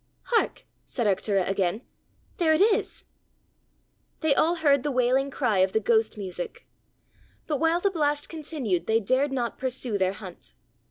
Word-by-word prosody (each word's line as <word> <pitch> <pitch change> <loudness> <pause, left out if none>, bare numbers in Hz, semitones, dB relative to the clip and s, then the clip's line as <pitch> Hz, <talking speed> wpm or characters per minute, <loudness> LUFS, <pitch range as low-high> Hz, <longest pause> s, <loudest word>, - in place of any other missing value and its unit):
"Hark!" 455 - +1 0.2
said 240 - -3
Arctura 195 -1 +1
again; 195 +3 -1 0.5
"there 320 -3 +3
it 310 - +2
is!" 415 +1 +1 1.2
They 315 -3 +3
all 330 +5 +2
heard 285 -5 +3
the 295 - -2
wailing 255 +1 +2
cry 240 -8 0
of 190 0 +2
the 220 - +3
ghost 220 0 +1
music. 185 -3 -6 0.8
But 295 -3 -2
while 330 +1 +2
the 400 +2 +1
blast 295 -4 0
continued 285 - -3
they 220 0 +3
dared 260 +6 +1
not 245 -3 -3
pursue 250 -5 -2
their 190 0 +1
hunt. 190 -4 -9
255 Hz, 155 wpm, -26 LUFS, 205-300 Hz, 1.2 s, there